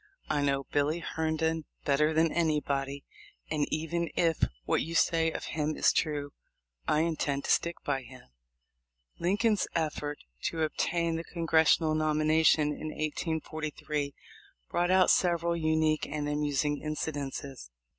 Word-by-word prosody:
I 150 -1 +1
know 140 -1 +1
Billy 145 +4 0
Herndon 160 -1 -1 0.2
better 150 +2 +3
than 160 0 +3
anybody, 140 -4 0 0.5
and 150 -2 0
even 165 +2 -1
if 165 -2 +2 0.2
what - - +2
you 165 +2 -4
say 165 -1 +3
of - - -5
him 155 0 -2
is - - +4
true 145 -2 -1 0.5
I 150 - +3
intend 150 -4 -1
to - - 0
stick 170 0 +2
by 135 -2 0
him." 125 0 -13 1.0
Lincoln's 205 +4 +2
effort 150 -2 -1 0.3
to 160 -1 0
obtain 165 +1 0
the 165 - -4
Congressional 160 -2 +3
nom 155 -1 +1
ination 155 -1 +4
in 155 - -6
1843 155 -2 -3 0.6
brought 175 +1 +1
out 185 0 +5
several 170 -1 +2
unique 155 -1 +1
and 145 0 -3
amusing 145 0 0
incidents. 140 - -4
155 Hz, 135 wpm, -30 LUFS, 145-165 Hz, 1.0 s, out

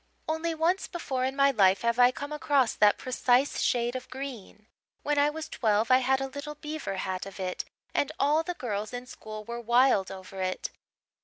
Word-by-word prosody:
Only 320 +1 -1
once 340 +5 +1
before 265 -7 -2
in 265 +1 -2
my 275 0 +4
life 195 -5 +4
have 235 +1 +1
I 245 0 +8
come 285 +3 -6
across 280 -5 +2
that 210 -1 +4
precise 255 +1 +1
shade 240 0 +1
of 255 0 -6
green. 250 -6 -8 0.4
When 295 0 +1
I 290 +1 +4
was 315 +1 -5
twelve 220 0 +1
I 255 - +7
had 265 +1 +2
a 270 - -2
little 285 +2 -7
beaver 300 -8 -5
hat 190 0 -3
of 195 - -10
it, 185 -1 -3 0.3
and 285 - +1
all 295 +3 +3
the 355 +2 -4
girls 215 - -4
in 245 0 -5
school 215 -4 -9
were 235 +1 -5
wild 240 -4 +3
over 190 0 -8
it. 185 0 -2
255 Hz, 200 wpm, -28 LUFS, 215-285 Hz, 0.4 s, I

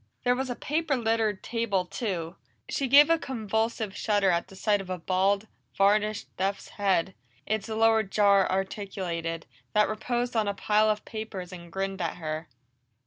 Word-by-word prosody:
There 245 - +4
was 260 +1 -2
a 245 - -2
paper 305 0 -1
littered 225 -3 0
table 225 -6 0
too; 180 -4 -4 0.3
she 275 - -1
gave 290 +5 +7
a 330 - +4
convulsive 220 -4 -2
shudder 205 -3 +2
at 170 0 0
the 195 - -14
sight 205 +1 +1
of 190 - -10
a 185 - -2
bald, 195 +4 +1 0.3
varnished 210 +2 +2
death's 195 +2 -2
head, 190 -2 +1 0.3
its 215 +1 -2
lower 225 0 +4
jar 200 -1 +3
articulated, 185 -4 -3 0.3
that 210 0 +4
reposed 240 +3 -2
on 220 -2 +2
a 200 - -1
pile 215 +1 +3
of 210 0 -1
papers 210 -5 -6
and 170 -1 -10
grinned 195 +1 -3
at 165 - -2
her. 155 -1 -5
205 Hz, 165 wpm, -28 LUFS, 190-225 Hz, 0.3 s, gave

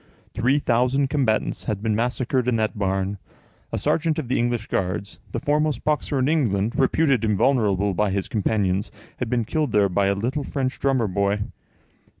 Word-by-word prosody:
Three 130 +4 +2
thousand 130 +1 +1
combatants 130 -7 0
had 105 -1 -3
been 110 -2 +1
massacred 125 +2 0
in 125 - +2
that 110 -1 0
barn. 95 -1 -1 0.5
A - - -1
sergeant 160 -1 +1
of 145 -7 -4
the 130 - +1
English 120 -2 0
Guards, 95 +1 -3
the - - -2
foremost 150 -2 0
boxer 150 -1 0
in 130 0 +1
England, 115 -9 +1
reputed 135 -2 +2
invulnerable 105 -2 +2
by 105 +3 +1
his 95 0 -2
companions, 100 -2 0 0.3
had 125 - -3
been 120 -2 0
killed 150 +1 -1
there 100 -2 +4
by 95 +2 +1
a 100 - +2
little 125 +8 -2
French 135 -2 -3
drummer 130 -5 +1
boy. 100 +2 0
115 Hz, 170 wpm, -23 LUFS, 100-135 Hz, 0.5 s, there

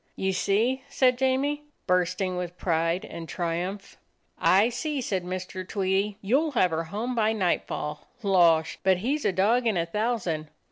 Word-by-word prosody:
"You 190 0 -1
see!" 220 +8 +1
said 255 -2 +3
Jamie, 275 +3 +1 0.2
bursting 180 +1 +1
with 180 0 -5
pride 165 +1 0
and 165 -1 -8
triumph. 180 +3 -3 0.4
"I 200 +5 +4
see," 285 +4 -3
said 195 -7 -2
Mr. 185 +1 -5
Tweedie. 195 +1 -1
"You'll 280 +9 +2
have 185 -8 +3
her 165 +1 -1
home 215 +9 -3
by 220 -2 +2
nightfall. 170 -6 -2 0.2
Losh! 170 -5 +3
but 190 -1 +3
he 245 +10 0
's 305 - -5
a - - +3
dog 220 +7 +2
in 215 -5 +1
a 170 - +1
thousand. 180 -6 -2
195 Hz, 160 wpm, -26 LUFS, 180-235 Hz, 0.4 s, I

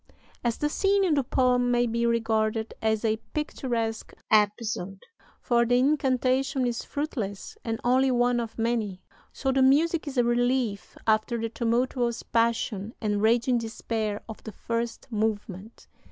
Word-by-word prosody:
"As 235 -1 0
the 295 - 0
scene 395 +6 +2
in 355 -5 +2
the 280 -2 +2
poem 250 -1 +2
may 240 0 +3
be 235 0 0
regarded 220 -1 0
as 220 0 0
a 220 0 +2 0.2
picturesque 235 -7 -2 0.2
episode 210 -2 +1 0.4
for 235 -2 +2
the 245 +1 +3
incantation 265 -1 +1
is 240 -1 -2
fruitless 230 -10 -4
and 225 -1 -3
only 260 +2 +3
one 245 -1 +2
of 230 -2 -5
many 225 -5 -1 0.3
so 270 - -1
the 265 0 +2
music 310 +5 +3
is 275 -2 -5
a 245 - +5
relief 240 -3 0
after 220 +2 +2
the 230 0 -2
tumultuous 235 0 0
passion 230 -2 0
and 210 -2 -1
raging 235 +2 +3
despair 220 -2 -3
of 220 - -9
the 220 - -7
first 230 +2 -3
movement. 210 -1 -3
235 Hz, 150 wpm, -27 LUFS, 220-255 Hz, 0.4 s, a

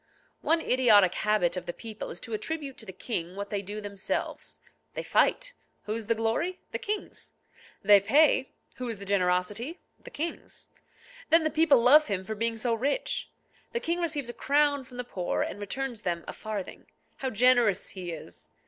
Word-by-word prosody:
One 325 +1 +2
idiotic 215 - +5
habit 210 -5 +1
of 180 -1 -5
the 175 - -3
people 220 0 -7
is 175 - -5
to 230 - -6
attribute 275 +5 -3
to 220 - -7
the - - -5
king 180 -3 -3
what 200 0 -6
they 205 -1 -1
do 205 +2 -6
themselves. 200 -2 -4 0.4
They - - -3
fight. - - +2 0.3
Whose 215 0 -4
the 230 - +2
glory? 225 +12 -1
The - - -3
king's. 420 0 -5 0.5
They 205 0 +8
pay. 270 +6 +4 0.3
Whose 240 -4 -3
the 200 - -8
generosity? 200 - 0 0.2
The - - -10
king's. 330 +3 -6 0.6
Then 330 0 +6
the 315 - 0
people 300 -5 +5
love 300 +5 +7
him 190 -3 -2
for 220 - -3
being 230 +1 0
so 235 +1 0
rich. 280 - -1 0.4
The 470 - 0
king 345 -4 -1
receives 300 -6 -1
a - - -17
crown 285 0 +2
from 250 -1 -13
the 250 - -2
poor, 185 -7 -2
and - - -5
returns 240 +3 -4
them 170 -3 -2
a - - -5
farthing. 215 -4 -6 0.3
How 265 - -2
generous 235 -4 +3
he 180 -3 -6
is! 160 - -8
230 Hz, 180 wpm, -28 LUFS, 200-280 Hz, 0.6 s, They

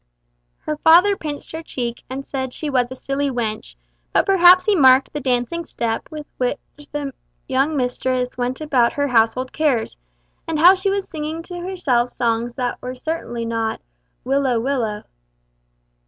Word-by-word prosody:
Her 305 - -3
father 350 +6 +6
pinched 300 -5 -6
her 320 - -5
cheek 240 -6 -5
and 270 +2 -5
said 260 -2 -4
she 300 -2 -4
was 250 -2 +1
a 260 - -7
silly 275 +2 -2
wench; 220 - -4 0.4
but - - +2
perhaps 365 -1 +6
he 420 - +3
marked 265 -4 +5
the 295 - -3
dancing 255 +5 -1
step 230 -7 -3
with 305 -2 -7
which 250 -1 0 0.3
the 285 -2 -4 0.3
young 275 +3 +1
mistress 250 0 -1
went 250 +3 -3
about 260 -6 +2
her 285 -1 -1
household 240 +2 +2
cares, 275 - 0 0.5
and 325 - -1
how 350 +5 +8
she 385 +1 -1
was 395 0 -1
singing 315 +1 -5
to 355 0 -7
herself 315 -10 0
songs 235 0 -1
that 250 -2 -2 0.2
certainly 250 -5 -4
were - - -4
not 225 -1 -2 0.4
"Willow! 265 -2 +1
willow!" 230 -5 -2
270 Hz, 160 wpm, -21 LUFS, 245-315 Hz, 0.5 s, how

